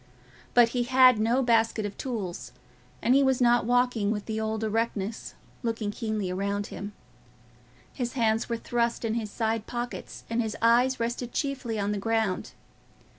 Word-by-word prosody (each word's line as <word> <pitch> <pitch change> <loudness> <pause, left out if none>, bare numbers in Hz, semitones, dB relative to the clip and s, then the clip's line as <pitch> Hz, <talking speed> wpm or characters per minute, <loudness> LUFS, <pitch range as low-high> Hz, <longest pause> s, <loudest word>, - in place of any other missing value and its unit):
But 240 -1 +7
he 245 +1 -1
had 255 -2 +6
no 235 +5 +2
basket 225 -2 +2
of 205 - -5
tools, 210 -9 -5 0.5
and 240 - +4
he 275 - +5
was 265 -2 +2
not 240 -2 +3
walking 245 -4 +2
with 210 -1 -2
the 220 -1 -3
old 220 0 -2
erectness, 220 -1 -2 0.3
looking 225 -3 -2
keenly 215 -4 -3
round 200 +2 -1
him; 205 +2 -6 1.0
his 245 -2 -3
hands 225 -2 +1
were 235 - -1
thrust 235 0 -1
in 220 - 0
his 225 -2 -2
side 220 0 -2
pockets, 240 0 -5
and 230 +1 0
his 220 -2 -3
eyes 245 +3 +3
rested 240 +1 -3
chiefly 265 -6 -2
on 200 0 0
the 205 - -2
ground. 220 -3 -1
230 Hz, 165 wpm, -27 LUFS, 215-245 Hz, 1.0 s, But